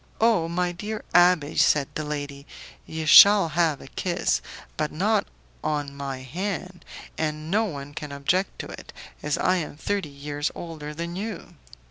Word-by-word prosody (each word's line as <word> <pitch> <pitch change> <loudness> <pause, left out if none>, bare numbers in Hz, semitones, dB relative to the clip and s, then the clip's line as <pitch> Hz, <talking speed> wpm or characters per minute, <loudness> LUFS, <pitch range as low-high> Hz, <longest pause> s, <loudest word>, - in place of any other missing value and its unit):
"Oh, 220 -7 +3
my 175 +1 0
dear 210 +5 -5
abbé!" 175 -4 +4
said 145 -2 +4
the 155 - -3
lady, 145 -1 -5 0.4
"you 160 0 -4
shall 200 +3 +9
have 160 -2 +1
a - - -10
kiss, 170 - -1 0.3
but - - -1
not - - +1 0.4
on 145 -2 -2
my 135 -2 -5
hand, 180 +5 -5 0.4
and 155 0 -2
no 220 +3 +3
one 145 -6 -6
can 150 -1 -6
object 150 +7 0
to - - -8
it, - - -10 0.3
as 150 -1 -1
I 185 0 +2
am 155 -4 -5
thirty 200 -1 -2
years 145 +1 -3
older 155 -3 -7
than 170 +2 -5
you." 200 -3 -6
160 Hz, 160 wpm, -25 LUFS, 145-180 Hz, 0.4 s, shall